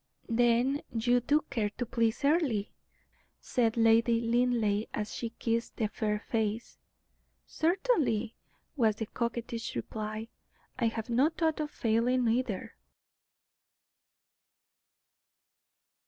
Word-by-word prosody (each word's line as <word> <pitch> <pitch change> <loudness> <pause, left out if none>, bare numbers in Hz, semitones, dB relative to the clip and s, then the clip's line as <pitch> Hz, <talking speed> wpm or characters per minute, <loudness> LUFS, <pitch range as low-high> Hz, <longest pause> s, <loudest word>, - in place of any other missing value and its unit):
"Then 240 +4 +2
you 240 +2 +2
do 290 +5 +2
care 215 -5 0
to 245 - -1
please 230 +3 0
Earle?" 285 - +2 0.8
said 230 -2 0
Lady 230 +1 +4
Linleigh, 230 -3 +1
as 210 0 -3
she 235 - -3
kissed 230 0 -1
the 215 -2 0
fair 210 -1 -1
face. 220 +1 -3 0.7
"Certainly," 315 - +1 0.4
was 225 -6 +3
the 220 - -3
coquettish 235 0 -4
reply. 215 - -4 0.5
"I 235 - +2
have 225 +1 -2
no 260 +6 +4
thought 320 -1 -1
of 300 -1 -2
failing, 240 +1 +1
either." 230 -4 -1
230 Hz, 105 wpm, -30 LUFS, 220-250 Hz, 0.8 s, Lady